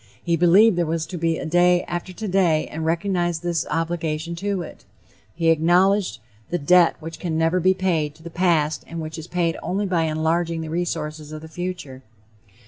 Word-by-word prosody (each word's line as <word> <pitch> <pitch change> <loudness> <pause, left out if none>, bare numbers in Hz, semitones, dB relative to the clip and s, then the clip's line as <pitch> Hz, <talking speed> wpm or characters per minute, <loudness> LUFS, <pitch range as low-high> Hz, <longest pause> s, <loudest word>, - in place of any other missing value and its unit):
He 170 -1 +1
believed 180 +5 +5
there 170 - +2
was 160 0 -1
to 185 - -8
be 165 0 +1
a - - -5
day 175 +2 +3
after 175 +2 -5
today 185 -5 +1
and 160 +1 -4
recognized 175 -1 0
his 170 -1 -1
obligation 165 0 -2
to 195 0 -2
it; - - -12 0.5
he 165 -1 +1
acknowledged 180 +5 +2 0.3
the 175 - 0
debt 175 +2 +4
which 165 0 -8
can 165 -3 -2
never 165 +3 +2
be 185 +2 +3
paid 165 -6 0
to 160 - -18
the 170 - -8
past 160 -4 +1
and 165 - -6
which 155 0 -6
is 160 - -9
paid 170 -2 -1
only 200 +3 -1
by 175 -4 +1
enlarging 160 +1 0
the 160 - -6
resources 155 -3 -3
of 155 0 -8
the - - -8
future. 170 -6 -6
170 Hz, 190 wpm, -22 LUFS, 160-180 Hz, 0.5 s, believed